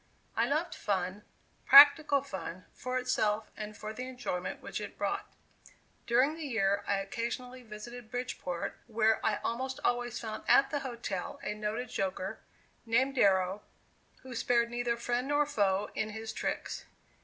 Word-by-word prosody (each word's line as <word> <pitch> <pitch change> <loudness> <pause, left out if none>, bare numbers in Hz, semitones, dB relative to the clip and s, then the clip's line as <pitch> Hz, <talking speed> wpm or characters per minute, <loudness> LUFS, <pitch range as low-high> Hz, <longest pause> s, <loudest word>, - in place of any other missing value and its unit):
I - - +2
loved - - 0
fun, 190 0 -2 0.4
practical 285 0 +9
fun, 185 -8 -6
for 255 0 -3
itself 220 -4 0
and 215 -1 -7
for 215 0 -6
the 250 +3 -5
enjoyment 185 -8 -4
which - - -5
it - - -7
brought. - - -2 0.8
During 255 +5 +4
the 320 -2 -5
year, 200 -4 +1
I 200 - +2
occasionally 235 +5 -4
visited 230 +1 -9
Bridgeport 220 -8 -4
where 225 -1 +2
I 210 -2 +2
almost 260 +3 -2
always 245 -1 0
found 220 -1 -5
at 270 - +5
the 290 - 0
hotel 235 -8 -4
a - - -2
noted 215 +4 -3
joker, 190 +2 -3 0.4
named 260 +4 +2
Darrow, 195 -4 +3 0.6
who 260 -1 -8
spared 235 0 +2
neither 240 -1 -1
friend 245 +2 -1
nor 290 +1 +3
foe 205 -8 +1
in 215 - -2
his 220 +1 -6
tricks. - - -3
230 Hz, 150 wpm, -31 LUFS, 210-255 Hz, 0.8 s, practical